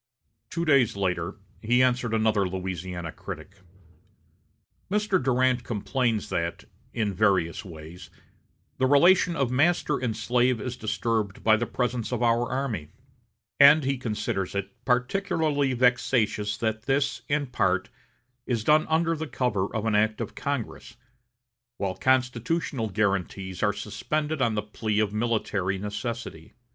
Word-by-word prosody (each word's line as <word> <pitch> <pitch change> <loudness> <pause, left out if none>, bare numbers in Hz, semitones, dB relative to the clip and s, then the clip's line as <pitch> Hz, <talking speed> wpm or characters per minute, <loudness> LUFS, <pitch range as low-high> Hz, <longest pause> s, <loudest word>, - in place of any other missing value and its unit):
Two 170 0 -2
days 135 -9 +3
later 90 -1 -1 0.3
he 120 +3 +3
answered 125 -2 +1
another 110 -3 +2
Louisiana 90 -2 -5
critic: 95 +5 -9 1.3
"Mr. 205 -3 +1
Durant 130 -1 +2
complains 115 0 -1
that, 85 0 -2 0.3
in 105 -3 -1
various 95 -4 +1
ways, 85 -1 -11 0.7
the 130 - +3
relation 175 +5 +5
of 135 -5 0
master 150 +3 +2
and 115 -3 -2
slave 120 +2 +2
is 125 +3 -4
disturbed 110 -2 -2
by 110 -1 +6
the 115 +1 -2
presence 125 -2 -2
of 125 -1 -1
our 120 0 +2
army, 120 - -3 0.7
and 145 +2 +8
he 135 -1 -1
considers 105 -5 -3
it 100 0 -3
particularly 145 +1 +1
vexatious 120 -4 +1
that 110 -1 -2
this, 140 0 +1
in 145 0 +1
part, 95 -7 0 0.6
is 115 -4 -1
done 155 +5 +4
under 165 +1 +2
cover 110 -9 0
of 110 0 -3
an 110 - +1
act 110 +1 +2
of - - -4
Congress, 120 -4 -4 0.8
while 95 -2 -2
constitutional 130 - 0
guarantees 95 -2 -1
are 105 - +3
suspended 150 +9 -3
on 115 -3 +2
the 105 - -1
plea 105 0 -2
of 105 -1 0
military 105 -4 -1
necessity. 105 -4 -6
115 Hz, 130 wpm, -26 LUFS, 100-130 Hz, 1.3 s, and